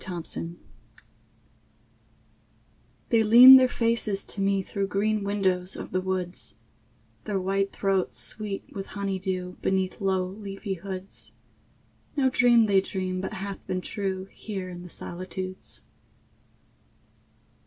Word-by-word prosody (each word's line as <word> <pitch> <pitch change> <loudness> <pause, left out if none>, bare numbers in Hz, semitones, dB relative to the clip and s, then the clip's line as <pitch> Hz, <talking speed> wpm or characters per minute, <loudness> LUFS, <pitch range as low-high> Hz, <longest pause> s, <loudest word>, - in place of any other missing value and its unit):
SECOND 175 -3 -5
SIGHT 170 +1 -4 2.5
They 230 -1 +4
lean 245 +5 +10
their 260 -1 +5
faces 230 -4 +1
to 200 - -3
me 195 0 +1
through 195 +1 -3
Green 210 +1 0
windows 190 -2 0
of - - -7
the 185 - 0
woods; 185 -1 -3 0.7
Their 205 -3 -1
white 195 +1 0
throats 195 -2 -1
sweet 210 -2 -3
with 195 -1 -6
honey 195 -1 -2
dew 185 -1 -4
Beneath 190 +1 -1
low 190 -1 +1
leafy 195 +1 -6
hoods 190 +1 -8 0.8
No 265 -2 +3
dream 240 -2 +5
they 195 -2 +4
dream 185 -1 -3
but 190 - -4
hath 195 0 -6
been 185 0 -2
true 190 -1 -3
Here 195 -4 -6
in 175 -1 -8
the 180 - -10
solitudes. 185 +2 -6
195 Hz, 125 wpm, -26 LUFS, 185-205 Hz, 2.5 s, lean